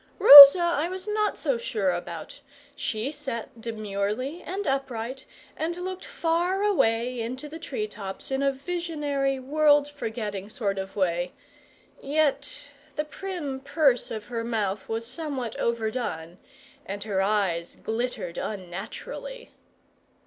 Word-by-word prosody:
Rosa 280 +4 +12
I 340 -1 0
was 370 +2 -6
not 425 0 0
so 275 -6 -1
sure 205 -5 -1
about; 170 -2 -6 0.4
she 225 +4 -3
sat 255 -6 -6
demurely 220 - -3
and 390 +3 -5
upright, 265 -2 -3 0.3
and 335 +2 -3
looked 370 +1 -6
far 355 -3 0
away 245 - +1
into 255 +6 -5
the 320 +2 -9
tree 260 -9 -4
tops 200 +1 -7
in 270 0 0
a 275 0 +2
visionary, 285 -3 -2
world 290 +2 +3
forgetting 220 -8 -5
sort 205 -5 -2
of 190 0 -7
way; 175 -2 -1 0.7
yet 290 -1 0 0.3
the 300 - -2
prim 310 -5 -5
purse 280 -2 +1
of 215 -2 -6
her 235 -2 -4
mouth 210 -4 -2
was 225 +1 -3
somewhat 270 -4 -5
overdone, 220 -7 -3 0.4
and 200 +1 -6
her 200 -3 -1
eyes 195 -4 0
glittered 225 -6 -3
unnaturally. 210 - -7
255 Hz, 125 wpm, -26 LUFS, 215-300 Hz, 0.7 s, Rosa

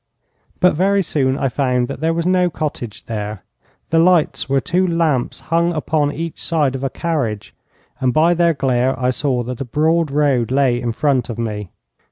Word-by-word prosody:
But 180 - +4
very 195 +4 +2
soon 135 -5 0
I 135 - 0
found 125 -2 0
that - - -6
there 160 +1 +1
was 165 0 -1
no 180 -1 +3
cottage 145 -9 -5
there. 105 -3 -5 0.5
The 165 - +4
lights 170 -4 +2
were 135 0 +3
two 180 +4 0
lamps 165 -7 0
hung 170 +1 +1
upon 155 -2 0
each 165 +1 -6
side 150 -5 0
of 135 0 -5
a 135 - 0
carriage, 120 - -3 0.5
and 130 -2 +1
by 160 +5 +4
their 170 -1 +2
glare 130 -1 0
I 125 0 +1
saw 130 -2 -1
that 125 +1 -6
a - - -2
broad 160 +5 +1
road 140 -5 +1
lay 130 -2 +2
in 120 -2 -1
front 130 0 0
of 115 - -5
me. 105 -4 -4
140 Hz, 190 wpm, -19 LUFS, 125-165 Hz, 0.5 s, But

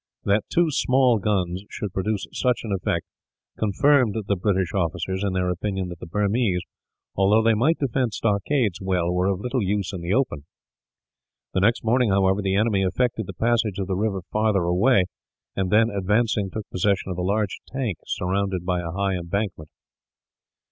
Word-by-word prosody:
That 100 +2 +1
two 170 -2 +3
small 130 -4 +3
guns 95 -2 -1
should 100 -3 -5
produce 100 +1 -1
such 125 -2 0
an 110 - -5
effect 95 -2 -1 0.5
confirmed 120 +2 +3
the 100 - +1
British 95 -1 0
officers 95 +1 -1
in 100 -2 0
their 90 -1 0
opinion 95 0 -3
that 85 -1 -8
the - - -8
Burmese, 100 0 0 0.5
although 100 +3 +4
they 115 0 +4
might 135 +10 +2
defend 130 -3 0
stockades 105 0 0
well, 90 -2 0
were 90 +1 +1
of 95 -2 0
little 125 +2 -1
use 100 -2 -1
in 90 - -5
the 85 +1 -3
open. 100 - 0 1.1
The - - +1
next 115 +6 +2
morning, 120 +1 +2
however, 95 0 +2
the 95 -1 0
enemy 105 -1 +2
effected 110 +3 0
the 95 - -6
passage 115 -1 +1
of 100 - -2
the 95 0 -2
river 100 -2 -1
farther 105 -3 +2
away 95 +4 +3 0.5
and 95 -1 -1
then, 115 +2 +4
advancing, 105 +1 +1
took 110 +2 -6
possession 95 +1 0
of 90 - -4
a - - 0
large 100 +2 -1
tank 125 - -3
surrounded 95 -1 -1
by 90 -1 0
a 85 - -5
high 100 +3 -1
embankment. 90 -2 -3
100 Hz, 175 wpm, -24 LUFS, 95-110 Hz, 1.1 s, although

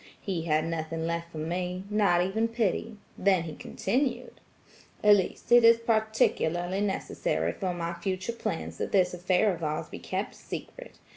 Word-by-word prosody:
He 175 -5 -3
had 155 -1 +2
nothing 165 0 -3
left 170 0 -3
for 160 - -9
me–not 180 +3 0
even 220 +5 0
pity. 225 -1 -1 0.2
Then 190 -3 +3
he 160 -2 -6
continued,– 250 - -2 0.6
'Elise, 205 0 +3
it 240 0 +8
is 230 0 +8
particularly 215 -5 +1
necessary 85 - -1
for 185 - -3
my 170 -1 -3
future 185 +5 -3
plans 80 - -4
that - - -2
this 180 -2 +3
affair 180 +3 +2
of 170 -1 -7
ours 155 0 -2
be - - -8
kept - - -3
secret. - - -9
185 Hz, 150 wpm, -28 LUFS, 170-210 Hz, 0.6 s, it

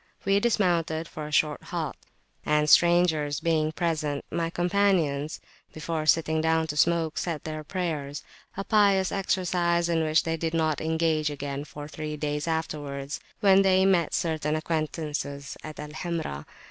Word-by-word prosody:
We 195 0 +4
dismounted 170 -7 +1
for 155 -2 -7
a - - -9
short 150 0 +2
halt; - - -3 0.5
and, 150 0 +2
strangers 165 -3 +4
being 160 -2 +1
present, 155 -4 -2
my 165 -1 -1
companions, 175 -5 +1 0.3
before 155 0 -3
sitting 160 0 +3
down 160 0 +2
to 150 -2 -5
smoke, 160 +1 +2
said 165 -5 -3
their 155 -1 -5
prayers 150 -5 -3 0.3
a 195 - -2
pious 200 -3 +3
exercise 175 -3 +1
in 165 -1 +2
which 155 0 +3
they 165 0 -1
did 165 0 -2
not 155 -2 +1
engage 160 -1 +1 0.4
for 145 +3 -8
three 155 0 -5
days 150 +1 -2
afterwards, 145 -3 -3 0.2
when 195 -2 +6
they 190 -1 +4
met 180 -5 +2
certain 155 -2 -1
acquaintances 155 -3 -3
at 155 -1 -8
Al 150 0 -6
Hamra. 160 - -4
160 Hz, 145 wpm, -27 LUFS, 150-170 Hz, 0.5 s, when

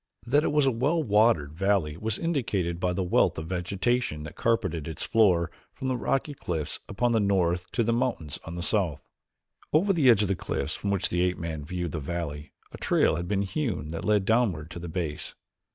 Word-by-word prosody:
That 145 +5 +3
it - - +1
was 150 -1 +3
a 135 - +4
well 145 +8 +1
watered 105 - +3
valley 95 -4 +1
was 110 +5 -2
indicated 105 - -1
by 90 0 +1
the 95 +1 -1
wealth 90 - +2
of 80 - -4
vegetation 95 0 -1
that 75 +1 -8
carpeted 85 -9 0
its 80 -3 -5
floor 90 -7 +3 0.2
from 130 - -3
the 130 - +1
rocky 135 +4 -1
cliffs 80 - -4
upon 120 +4 +1
the 115 - +3
north 90 -3 +1
to 120 - +2
the 115 +1 +1
mountains 115 - -1
on 80 - -7
the 85 - -4
south. 85 - 0 0.6
Over 190 +6 +3
the 150 -7 +4
edge 110 -3 +6
of - - 0
the 95 - +1
cliffs - - -3
from 100 - -3
which 100 -2 +1
the 90 - 0
ape 90 0 +1
man 80 -3 -4
viewed 90 +1 -3
the 80 - -3
valley 75 -1 -5 0.2
a - - -10
trail - - +3
had 85 +1 -3
been 100 +1 +1
hewn 100 - -2
that 80 +1 -5
led 105 -2 +2
downward 95 -9 +1
to 85 - -6
the 85 0 -6
base. 80 -3 -4
95 Hz, 215 wpm, -27 LUFS, 85-115 Hz, 0.6 s, edge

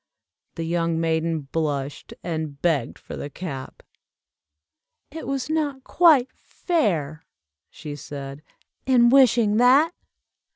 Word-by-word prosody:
The 165 - -4
young 165 0 -1
maiden 165 -1 0
blushed, 145 -1 -4
and 155 -4 -4
begged 165 -4 0
for - - -9
the 145 - -6
cap. 140 -5 -8 1.3
"It 320 +2 -7
was 275 -2 -2
not 295 -4 -2
quite 295 -8 +4
fair," 165 - -2 0.4
she 150 -2 -8
said, 140 0 -8 0.5
"in 240 -2 +5
wishing 235 -5 +4
that!" 270 +8 +5
170 Hz, 110 wpm, -23 LUFS, -, 1.3 s, in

